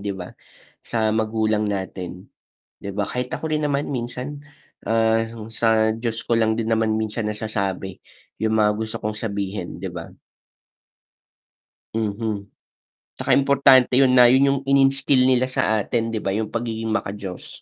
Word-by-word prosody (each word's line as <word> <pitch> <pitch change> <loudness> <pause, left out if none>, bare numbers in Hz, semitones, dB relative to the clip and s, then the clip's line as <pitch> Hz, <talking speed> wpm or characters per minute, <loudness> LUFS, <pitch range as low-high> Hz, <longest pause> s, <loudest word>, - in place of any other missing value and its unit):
di 100 0 -3
ba 90 -2 -8 0.5
sa 110 -2 -1
magulang 110 -1 0
natin. 95 -2 -5 0.5
Di 100 - -7
ba 100 0 -2
kahit 125 0 -3
ako 160 - -3
rin 155 -1 0
naman 145 0 -1
minsan, 130 +3 -5 0.4
ah, 115 0 +2 0.2
sa 110 -1 +2
Diyos 115 0 -3
ko 115 - 0
lang 110 -1 +2
din 110 0 -2
naman 110 -1 +2
minsan 110 0 -2
nasasabi, 100 -3 -3 0.4
yung 110 0 0
mga 105 0 +4
gusto 110 0 -4
kong 105 0 -3
sabihin, 100 -4 -4
di - - -3
ba? - - -7 1.9
Mhm. 105 -1 -2 0.7
'Tsaka - - -2
importante 135 -2 +5
yun 135 -2 +5
na, 125 -1 +8
yun 130 +3 +5
yung 140 - 0
ininstill 135 -1 +4
nila 130 0 +3
sa 110 -4 +1
atin 115 +2 -1
di 110 - -2
ba 100 - -2
yung 110 0 -2
pagiging 115 -1 -3
maka 110 - -1
Diyos. 95 -3 -9
110 Hz, 155 wpm, -22 LUFS, 105-125 Hz, 1.9 s, na